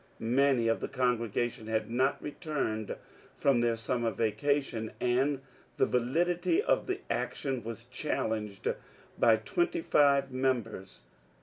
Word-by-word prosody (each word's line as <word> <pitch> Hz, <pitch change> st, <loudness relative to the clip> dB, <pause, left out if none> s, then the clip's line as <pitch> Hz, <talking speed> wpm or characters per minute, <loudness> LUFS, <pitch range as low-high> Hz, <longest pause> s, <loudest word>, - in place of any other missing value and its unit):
Manj 125 Hz, 0 st, +3 dB
of 115 Hz, -, +2 dB
the -, -, -3 dB
congregation 120 Hz, -2 st, -1 dB
had 110 Hz, 0 st, -1 dB
not 130 Hz, +3 st, +2 dB
returned 145 Hz, -, -3 dB, 0.4 s
from 135 Hz, -4 st, +3 dB
their 120 Hz, -1 st, +2 dB
summer 115 Hz, +1 st, -1 dB
vacation, 115 Hz, +2 st, -1 dB
and 130 Hz, +3 st, +1 dB, 0.4 s
the -, -, +4 dB
validity 175 Hz, -, +1 dB
of 445 Hz, -, +1 dB
the 380 Hz, +1 st, -2 dB
action 130 Hz, -4 st, -2 dB
was 115 Hz, +1 st, -7 dB
challenged 110 Hz, -6 st, -2 dB, 0.5 s
by 115 Hz, -, +6 dB
twenty 345 Hz, -, -1 dB
five 140 Hz, -, +3 dB
members. 130 Hz, -7 st, -2 dB
125 Hz, 120 wpm, -30 LUFS, 115-140 Hz, 0.5 s, by